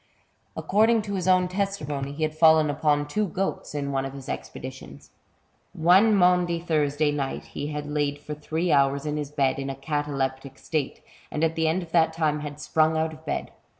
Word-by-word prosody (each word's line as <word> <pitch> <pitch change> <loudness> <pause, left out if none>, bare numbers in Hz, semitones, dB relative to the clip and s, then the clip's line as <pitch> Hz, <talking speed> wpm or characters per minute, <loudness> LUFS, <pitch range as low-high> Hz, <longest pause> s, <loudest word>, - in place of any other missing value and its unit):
According 220 +2 +3
to 205 -1 -5
his 185 -2 -2
own 185 -1 +4
testimony, 180 -8 -3
he 150 +2 -4
had 155 0 -1
fallen 160 -1 +5
upon 145 0 +1
two 210 +7 -1
goats 190 -3 -3
in 140 -1 -2
one 135 -1 0
of 135 0 -5
his 135 -1 -9
expeditions. 130 +1 -8 0.6
One 190 +7 +5
Maundy 180 -2 +3
Thursday 150 -3 +1
night 140 -2 -3
he 145 - -4
had 150 -1 -4
lain 145 -1 -1
for 150 +1 -7
three 160 +3 -2
hours 140 0 +3
in 150 0 -2
his 145 -2 -4
bed 135 -2 0
in 135 0 -4
a 135 - -4
cataleptic 135 -2 -3
state, 155 -4 -3 0.3
and 150 - -2
at 165 0 +2
the 160 -1 0
end 170 +3 0
of 165 - -13
that 160 -1 +3
time 155 -2 0
had 150 0 -7
sprung 155 +1 +2
out 160 0 0
of 155 0 -14
bed. - - -3
150 Hz, 195 wpm, -25 LUFS, 145-170 Hz, 0.6 s, fallen